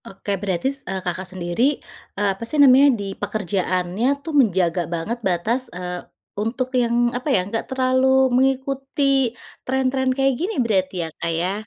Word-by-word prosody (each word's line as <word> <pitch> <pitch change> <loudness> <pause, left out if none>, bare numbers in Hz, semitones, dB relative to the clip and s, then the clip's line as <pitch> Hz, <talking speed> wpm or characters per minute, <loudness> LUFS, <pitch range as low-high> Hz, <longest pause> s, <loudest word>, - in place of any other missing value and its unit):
Oke. 195 +1 -6
Berarti, 190 +2 -1
s 275 - -13
eee, 190 -1 -3
Kakak 185 +1 -3
sendiri, 185 +10 0 0.4
eee, 205 0 +1
apa 195 - -9
sih 305 - -2
namanya, 280 0 +7
di 195 -1 -4
pekerjaannya 190 0 -1 0.2
tuh 320 - -4
menjaga 180 -6 +1
banget 170 +8 -3
batas, 220 +7 -1
eee, 180 0 -5 0.4
untuk 250 +4 -2
yang 240 -1 +2
apa 250 +4 -3
ya? 185 -9 +2
Enggak 225 +4 -4
terlalu 260 0 +1 0.3
mengikuti 270 0 +1 0.3
tren-tren 260 0 0
kayak 270 0 +3
gini 400 +5 -2
berarti 190 -4 0
ya, - - -6
Kak 170 0 -1
ya. 180 +3 0
230 Hz, 160 wpm, -22 LUFS, 185-265 Hz, 0.4 s, namanya